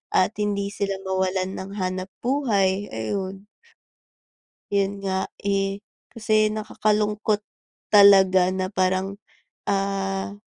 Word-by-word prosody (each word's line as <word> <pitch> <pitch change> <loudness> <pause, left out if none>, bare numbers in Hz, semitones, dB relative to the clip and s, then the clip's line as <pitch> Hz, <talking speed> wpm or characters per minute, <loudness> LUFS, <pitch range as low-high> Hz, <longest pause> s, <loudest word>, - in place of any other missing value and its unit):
at 185 - +4
hindi 200 -1 -1
sila 200 -1 -2
mawalan 190 0 -1
ng 190 +1 -7
hanap-buhay, 195 +2 0
ayun. 190 - -4 1.3
'Yon 200 0 0
nga, 190 0 -1 0.2
eh, 195 0 0 0.3
kasi 215 -2 +2
nakakalungkot, 210 0 0 0.5
talaga 190 -3 +7
na 185 0 -1
parang, 185 +1 0 0.5
ah, 195 0 -1
195 Hz, 90 wpm, -24 LUFS, 190-205 Hz, 1.3 s, talaga